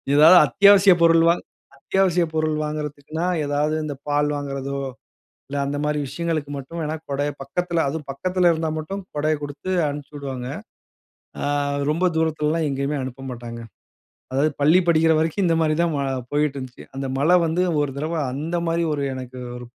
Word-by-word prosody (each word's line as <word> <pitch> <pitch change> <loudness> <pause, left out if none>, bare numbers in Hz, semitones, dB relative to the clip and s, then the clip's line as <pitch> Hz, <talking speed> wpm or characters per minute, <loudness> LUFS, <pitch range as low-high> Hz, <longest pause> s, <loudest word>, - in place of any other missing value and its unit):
ஏதாவது 160 +5 +8
அத்தியாவசியப் 200 -3 +6
பொருள் 165 0 +5
வாங் 170 - +1 0.3
அத்தியாவசியப் 175 +1 +1
பொருள் 155 -1 +1
வாங்குறதுக்குன்னா, 150 +1 -4 0.2
ஏதாவது, 145 +2 0
இந்த 145 -2 -4
பால் 145 0 +1
வாங்குறதோ, 140 -1 -4 0.7
இல்ல, 145 - -4
அந்த 140 +1 -2
மாரி 150 0 0
விஷயங்களுக்கு 155 0 -3
மட்டும் 165 +5 -7
வேணா, 155 +1 -2
குடைய 145 +1 0
பக்கத்தில 170 +4 -1
அதுவும் 150 0 -5
பக்கத்தில 180 +5 +1
இருந்தா 160 0 -1
மட்டும் 195 +6 -5
கொடைய 155 +1 +1
கொடுத்து 145 +5 -6 0.2
அனுப்பிச்சுவுடுவாங்க. 140 -3 -6 0.9
அ - - -1 0.5
ரொம்ப 170 +4 -1
தூரத்திலலேல்லா 160 0 +1
எங்கேயுமே 140 +2 -1
அனுப்ப 130 +1 -8
மாட்டாங்க. 120 -1 -7 0.7
அதாவது 140 +4 +2
பள்ளி 155 +5 +5
படிக்கிற 160 -1 +4
வரைக்கும் 165 +5 0
இந்த 165 - +3
மாரி 155 -1 +2
தான் 170 -1 +1
வா 140 - -1 0.3
போயிட்டு 145 -1 +1
இருந்துச்சு. 130 -2 -9
அந்த 135 0 -3
மழை 160 +6 +4
வந்து 165 +3 +1 0.2
ஒரு 145 - 0
தடவ 155 +4 -3 0.2
அந்த 155 +6 -3
மாரி 165 +1 +1
ஒரு 145 - -2
எனக்கு 130 0 -8 0.2
ஒரு 125 - -9
150 Hz, 160 wpm, -22 LUFS, 140-165 Hz, 0.9 s, ஏதாவது